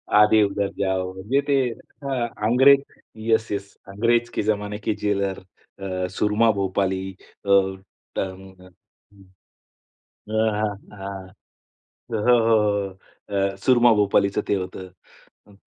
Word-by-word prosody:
आधे 105 +1 +6
उधर 100 0 0
जाओ, 95 -1 -1
म्हणजे 105 +9 0
ते 140 - +3 0.5
हां 130 -4 -1 0.2
अंग्रेज. 135 +4 +6 0.5
Yes, 115 0 +2
yes. 100 -1 -4
अंग्रेज 115 +4 +1
के - - 0
जमाने 105 -1 -1
के 105 - -1
जेलर, 100 -2 -1 0.4
अ, 95 -1 -3
सुरमा 105 +2 +3
भोपाली 95 -1 -1 0.3
अ, - - -5 0.7
ट - - -2
अ, 95 0 -11 0.8
हां, 110 -1 0 0.2
हां. 95 -1 -7 0.9
हो, 110 - 0
हो, 120 - +7
हो. 100 -3 +1 0.4
अ, 100 0 0
सुरमा 120 -2 +6
भोपालीचं 100 -1 +2
ते - - +2
होतं. 95 0 -6 0.6
अ, 105 - -18
100 Hz, 120 wpm, -23 LUFS, 95-110 Hz, 0.9 s, हो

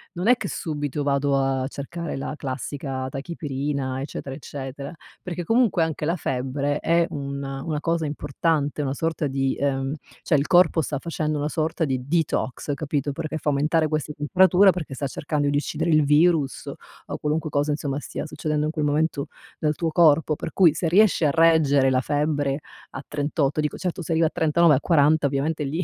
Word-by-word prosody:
non 180 +4 -2
è 250 +1 +6
che 225 -4 -4
subito 145 -4 -3
vado 140 0 +1
a 135 -1 0
cercare 155 +4 -5
la 135 - -4
classica 135 -1 -4
tachipirina, 140 -2 -3
eccetera, 135 -1 -6
eccetera, 140 +1 -7 0.3
perché 175 -1 -4
comunque 225 -1 +2
anche 160 -2 -1
la 165 +3 +1
febbre 140 -1 -2
è 170 0 +2
un 140 -1 -5
una 135 +3 -3
cosa 165 +1 -1
importante, 145 0 -1
una 135 -1 -1
sorta 160 +1 -2
di, 135 -1 -1
uhm 135 -1 0 0.3
cioè 160 - +1
il 140 0 +2
corpo 175 -1 +4
sta 145 -2 -3
facendo 155 -1 -2
una 145 +1 -1
sorta 160 +1 -1
di 130 -2 -3
detox, 150 -3 -1
capito, 145 -1 -2
perché 155 +2 -4
fa 150 - -1
aumentare 155 +3 +2
questa 155 0 -2
temperatura, 185 +6 +5
perché 175 -6 -2
sta 140 +1 -3
cercando 145 +1 -1
di 145 - +1
uccidere 150 +3 -2
il 155 -2 +4
virus, 150 -2 +2 0.4
o - - -4
qualunque 155 +1 -1
cosa 145 +1 0
insomma 145 -1 -2
stia 150 - -6
succedendo 150 0 -2
in 155 - -1
quel 155 -2 -1
momento 150 0 0 0.3
nel 150 -1 +2
tuo 165 +2 -2
corpo; 155 -2 +4
per 160 - -6
cui 170 -5 +5
se 165 - -1
riesce 190 -2 +4
a 145 - +3
reggere 155 -4 +4
la 130 -1 +2
febbre 145 -1 0 0.3
a 135 - -7
38, 145 0 -1
dico: 150 - -2
certo 180 -1 -3
se 165 - -5
arrivi 165 0 +3
a - - -2
39, 160 0 +3
a - - +1
40, 155 -1 +3
ovviamente 145 +3 -1
lì 155 +6 -2
150 Hz, 185 wpm, -24 LUFS, 140-160 Hz, 0.4 s, è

